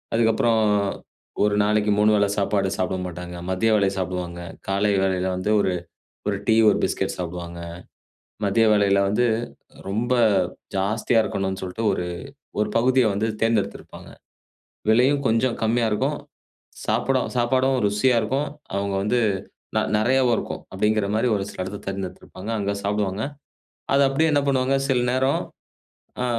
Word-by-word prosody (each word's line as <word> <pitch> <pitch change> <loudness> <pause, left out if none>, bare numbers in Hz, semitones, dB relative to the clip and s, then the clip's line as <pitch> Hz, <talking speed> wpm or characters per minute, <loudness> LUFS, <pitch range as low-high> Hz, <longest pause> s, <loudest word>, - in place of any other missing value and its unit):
அதுக்கப்புறம் 115 0 +3 0.8
ஒரு 105 0 +1
நாளைக்கு 105 0 +2
3 105 +1 +5
வேள 100 -1 +3
சாப்பாடு 100 -1 +1
சாப்ட 95 0 0
மாட்டாங்க. 90 0 -7 0.2
மதிய 110 +5 +1
வேளை 100 -2 +3
சாப்டுவாங்க. 90 -1 -3 0.3
காலை 100 +1 +2
வேளையில 95 -1 0
வந்து 100 +3 -1
ஒரு 95 - 0 0.6
ஒரு 100 - -1
டீ, 110 - +5 0.2
ஒரு - - +2
பிஸ்கட் - - -1
சாப்டுவாங்க. 85 -1 -5 0.9
மதிய 105 +3 +3
வேளையில 100 -1 +3
வந்து 120 +5 +2 0.6
ரொம்ப 115 +5 0 0.6
ஜாஸ்தியா 105 +4 +1
இருக்கணும்னு 95 -1 -2
சொல்ட்டு 95 +5 -4
ஒரு 90 - -2 0.6
ஒரு 105 - +1
பகுதிய 130 +1 +4
வந்து 105 +3 0 0.2
தேர்ந்தெடுத்திருப்பாங்க. 115 -3 -2 0.8
விலையும் 130 +5 +4
கொஞ்சம் 115 +2 +1
கம்மியா 115 +1 +2
இருக்கும். 105 - 0 0.7
சாப்டும் 130 -1 +1
சாப்பாடும் 130 +2 +2
ருசியா 110 +5 +2
இருக்கும். 135 +7 -1 0.3
அவங்க 100 0 -1
வந்து 120 +4 +1 0.6
ந - - +5 0.2
நெறையாவும் 125 +2 +3
இருக்கும். - - -5
அப்டிங்கிற 105 +1 +1
மாரி 120 +3 +2
ஒரு 100 - -1
சில - - -6
இடத்த 100 +2 -6
தேர்ந்தெடுத்திருப்பாங்க. 95 +1 -6
அங்க 100 0 -1
சாப்டுவாங்க. 100 0 -1 0.7
அத 140 - +5
அப்டியே 155 +4 +2
என்ன 145 - +3
பண்ணுவாங்க? 135 0 +2
சில 125 -2 +2
நேரம் 130 +2 +1 0.8
ஆ. - - +1
105 Hz, 135 wpm, -23 LUFS, 95-120 Hz, 0.9 s, 3